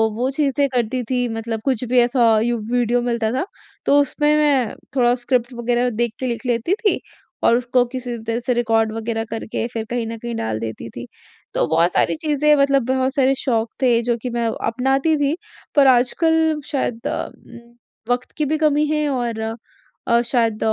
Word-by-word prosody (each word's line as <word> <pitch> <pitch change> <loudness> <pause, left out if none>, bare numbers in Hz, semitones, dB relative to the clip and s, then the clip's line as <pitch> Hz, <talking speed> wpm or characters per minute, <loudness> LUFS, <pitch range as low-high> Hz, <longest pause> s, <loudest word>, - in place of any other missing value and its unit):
वो 250 +3 0
चीज़ें 280 0 +1
करती 245 +1 0
थी 250 -1 +1
मतलब 225 0 -4
कुछ 260 -4 0
भी 250 0 +4
ऐसा 240 -1 +3
यूँ 240 0 0
वीडियो 245 0 +2
मिलता 235 -2 -1
था, 260 +8 -1 0.4
तो 285 - +5
उसमें 295 +2 +2
मैं 280 -7 +2 0.2
थोड़ा 245 -2 +4
स्क्रिप्ट 245 0 -1
वग़ैरह 240 +1 0
देख 235 0 0
के 260 - -3
लिख 240 +1 -4
लेती 240 +7 0
थी 425 -1 +1 0.4
और 230 - +5
उसको 250 0 +2
किसी 250 0 -6
भी 220 - -11
तरह 230 +1 -1
से 250 - +2
रिकॉर्ड 225 -2 +1
वग़ैरह 225 0 -2
करके, 225 0 -3
फिर 230 -2 -5
कहीं 240 -1 -2
न 230 0 -5
कहीं 235 +1 -5
डाल 110 - -2
देती 115 0 -6
थी। 120 +1 -8 0.5
तो - - +2
बहुत 165 +2 +3
सारी - - +2
चीज़ें 300 -1 +3
मतलब 275 -3 +3
बहुत 260 +1 0
सारे 270 -1 +3
शौक 230 -4 0
थे, 240 -3 +3
जो 240 0 0
कि 250 - -3
मैं 235 -1 -1 0.2
अपनाती 270 +6 +1
थी, 290 +1 +1 0.4
पर 280 -2 +6
आजकल 315 +5 +3
शायद 245 -5 -2
उम, 235 0 -8
वक़्त 245 0 -5
की 305 - +1
भी 310 +2 0
कमी 300 -1 +2
है 300 -1 +1
और 240 -4 -2 0.7
अ, 235 -1 +4
शायद 230 -3 0
245 Hz, 190 wpm, -20 LUFS, 230-270 Hz, 0.7 s, पर